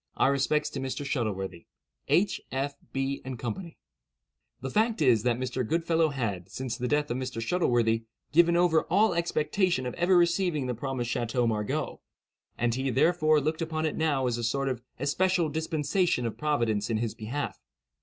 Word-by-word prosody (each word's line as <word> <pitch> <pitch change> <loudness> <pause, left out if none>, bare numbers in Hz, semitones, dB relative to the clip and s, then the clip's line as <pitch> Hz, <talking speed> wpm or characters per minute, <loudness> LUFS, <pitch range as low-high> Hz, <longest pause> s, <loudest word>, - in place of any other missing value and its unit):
Our 135 - +4
respects 140 +2 +1
to 140 - -4
Mr. 135 +2 -3
Shuttleworthy. 95 - -3 0.4
"H., 195 +3 +2
F., 135 +2 -1 0.2
B., 135 +1 -2
& 130 - -5
CO." 115 -1 -2 1.1
The 135 - -4
fact 220 +1 +2
is, 125 -8 +4
that 120 0 +1
Mr. 130 0 -2
Goodfellow 165 +4 +1
had, 105 - -3
since 130 +1 -4
the 125 -1 -2
death 150 +1 +1
of 120 - -1
Mr. 130 -3 -4
Shuttleworthy, 115 -5 +1 0.3
given 170 +3 +5
over 175 -2 +3
all 205 +4 +3
expectation 170 -2 0
of 125 - -3
ever 175 +1 +3
receiving 170 -4 +2
the 125 - -1
promised 125 0 -3
Chateau 120 0 0
Margaux; 115 +7 -2 0.6
and 120 -1 +1
he, 130 +2 -1
therefore, 155 +3 +3
looked 155 +3 -2
upon 160 -1 -1
it 155 - -1
now 145 -5 +1
as 120 -1 0
a - - -3
sort 135 +4 0
of 125 -3 -3 0.2
especial 170 +5 +1
dispensation 160 -1 0
of 115 - -3
Providence 115 -9 0
in 115 - +1
his 115 -1 -2
behalf. 120 +6 -4
135 Hz, 175 wpm, -28 LUFS, 120-160 Hz, 1.1 s, given